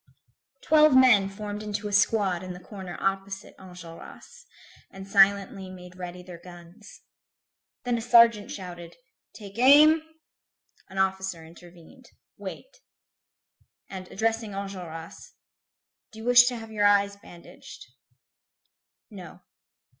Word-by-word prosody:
Twelve 305 Hz, -3 st, +5 dB
men 235 Hz, -7 st, +5 dB
formed 205 Hz, +1 st, -7 dB
into 210 Hz, 0 st, -5 dB
a -, -, -6 dB
squad 200 Hz, -4 st, +1 dB
in 185 Hz, -1 st, -7 dB
the 180 Hz, -, -11 dB
corner 190 Hz, -2 st, -9 dB
opposite 195 Hz, 0 st, -4 dB
Enjolras, 180 Hz, -, -13 dB, 0.4 s
and 195 Hz, 0 st, -11 dB
silently 195 Hz, -1 st, +2 dB
made 180 Hz, -1 st, -12 dB
ready 180 Hz, 0 st, -8 dB
their 175 Hz, -2 st, -11 dB
guns. 175 Hz, +3 st, -15 dB, 0.8 s
Then 245 Hz, -2 st, -1 dB
a -, -, -6 dB
sergeant 230 Hz, -3 st, +4 dB
shouted: 175 Hz, -3 st, -9 dB, 0.4 s
"Take 205 Hz, 0 st, -11 dB
aim!" 300 Hz, +5 st, +6 dB, 0.9 s
An 190 Hz, -, -11 dB
officer 190 Hz, -3 st, -2 dB
intervened. 175 Hz, +9 st, -17 dB, 0.3 s
"Wait." -, -, -10 dB, 1.1 s
And 185 Hz, -1 st, -8 dB
addressing 225 Hz, +1 st, -2 dB
Enjolras: 180 Hz, -5 st, -8 dB, 0.8 s
"Do 220 Hz, -, -15 dB
you 220 Hz, -, -9 dB
wish 245 Hz, 0 st, +7 dB
to 250 Hz, 0 st, -1 dB
have 225 Hz, -1 st, -10 dB
your 205 Hz, -1 st, +2 dB
eyes 200 Hz, 0 st, +2 dB
bandaged?" 175 Hz, -3 st, -14 dB, 1.3 s
"No." -, -, -12 dB
195 Hz, 115 wpm, -26 LUFS, 180-225 Hz, 1.3 s, wish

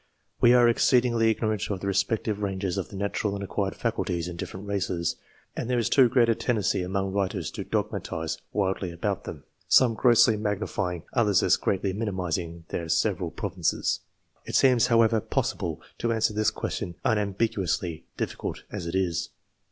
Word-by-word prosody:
We 120 Hz, +1 st, +6 dB
are 120 Hz, -1 st, +6 dB
exceedingly 120 Hz, -1 st, +3 dB
ignorant 110 Hz, -3 st, -1 dB
of 100 Hz, -3 st, -2 dB
the -, -, -5 dB
respective 100 Hz, +2 st, 0 dB
ranges 95 Hz, -2 st, -2 dB
of 95 Hz, -3 st, -3 dB
the -, -, -10 dB
natural 100 Hz, +1 st, -1 dB
and 100 Hz, -, -5 dB
acquired 100 Hz, 0 st, -2 dB
faculties 90 Hz, -7 st, -2 dB
in 90 Hz, -, -6 dB
different 95 Hz, +3 st, -7 dB
races, 95 Hz, -4 st, -1 dB, 0.4 s
and 120 Hz, -, -4 dB
there 125 Hz, -, +2 dB
is 115 Hz, -, +1 dB
too 130 Hz, -3 st, +6 dB
great 120 Hz, -1 st, +4 dB
a 115 Hz, -, +4 dB
tendency 110 Hz, -5 st, 0 dB
among 95 Hz, +1 st, -2 dB
writers 95 Hz, -3 st, -1 dB
to -, -, -5 dB
dogmatize 80 Hz, 0 st, -3 dB
wildly 95 Hz, -2 st, -1 dB
about 85 Hz, -, -3 dB
them, -, -, -7 dB, 0.2 s
some 125 Hz, -3 st, +5 dB
grossly 115 Hz, -1 st, +5 dB
magnifying, 100 Hz, -4 st, -2 dB
others 105 Hz, -6 st, +3 dB
as -, -, +5 dB
greatly 95 Hz, -1 st, -1 dB
minimising 90 Hz, -5 st, -3 dB
their 85 Hz, -1 st, -4 dB
several -, -, +1 dB
provinces. -, -, -1 dB, 0.4 s
It -, -, -5 dB
seems 125 Hz, -3 st, +5 dB
however 115 Hz, -1 st, +4 dB
possible -, -, -2 dB, 0.2 s
to 115 Hz, -, 0 dB
answer 110 Hz, -1 st, +1 dB
this 110 Hz, 0 st, +2 dB
question 85 Hz, -, -4 dB
unam 105 Hz, -3 st, +1 dB
biguously, 95 Hz, -6 st, -1 dB, 0.2 s
difficult -, -, -4 dB
as 85 Hz, -, -5 dB
it 85 Hz, -, -3 dB
is. 90 Hz, -4 st, 0 dB
100 Hz, 165 wpm, -26 LUFS, 95-115 Hz, 0.4 s, We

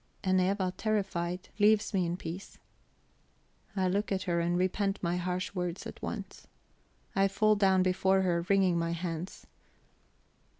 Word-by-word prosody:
And 185 Hz, -1 st, +3 dB
Eva, 185 Hz, 0 st, 0 dB
terrified, 185 Hz, -5 st, -1 dB
leaves 210 Hz, +1 st, +4 dB
me 185 Hz, -3 st, +2 dB
in 170 Hz, +1 st, -2 dB
peace. 180 Hz, +2 st, -7 dB, 1.2 s
I 190 Hz, -2 st, +1 dB
look 200 Hz, +3 st, 0 dB
at 190 Hz, -1 st, 0 dB
her, 170 Hz, -1 st, 0 dB
and 175 Hz, +1 st, +1 dB
repent 195 Hz, +2 st, 0 dB
my 175 Hz, 0 st, 0 dB
harsh 180 Hz, +1 st, -2 dB
words 180 Hz, -1 st, -3 dB
at -, -, -8 dB
once; -, -, -6 dB, 0.7 s
I 195 Hz, 0 st, +4 dB
fall 215 Hz, +2 st, +3 dB
down 190 Hz, -2 st, +4 dB
before 190 Hz, +1 st, +2 dB
her; 175 Hz, -2 st, +1 dB
wringing 190 Hz, -3 st, +3 dB
my 165 Hz, 0 st, -1 dB
hands. 170 Hz, +1 st, -5 dB
185 Hz, 145 wpm, -30 LUFS, 175-195 Hz, 1.2 s, leaves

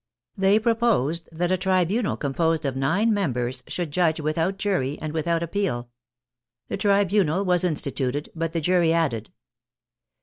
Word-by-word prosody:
They 195 Hz, +2 st, +4 dB
proposed 220 Hz, -, +1 dB
that 175 Hz, +2 st, -1 dB
a 185 Hz, -, +3 dB
tribunal 190 Hz, +4 st, +1 dB
composed 160 Hz, +2 st, 0 dB
of 135 Hz, -2 st, -1 dB
nine 185 Hz, +12 st, +2 dB
members 130 Hz, -, -1 dB
should 175 Hz, -4 st, -4 dB
judge 160 Hz, 0 st, +1 dB
without 160 Hz, +5 st, -1 dB
jury 185 Hz, -9 st, -1 dB
and 155 Hz, 0 st, -5 dB
without 165 Hz, +1 st, 0 dB
ap 170 Hz, -, -6 dB
peal. 125 Hz, -13 st, -2 dB, 0.8 s
The -, -, -2 dB
tribunal 200 Hz, -3 st, +2 dB
was 180 Hz, -1 st, +2 dB
instituted 145 Hz, -4 st, -2 dB
but 165 Hz, -1 st, -2 dB
the 165 Hz, -, -2 dB
jury 175 Hz, 0 st, +3 dB
added. 135 Hz, -10 st, 0 dB
170 Hz, 145 wpm, -24 LUFS, 150-195 Hz, 0.8 s, They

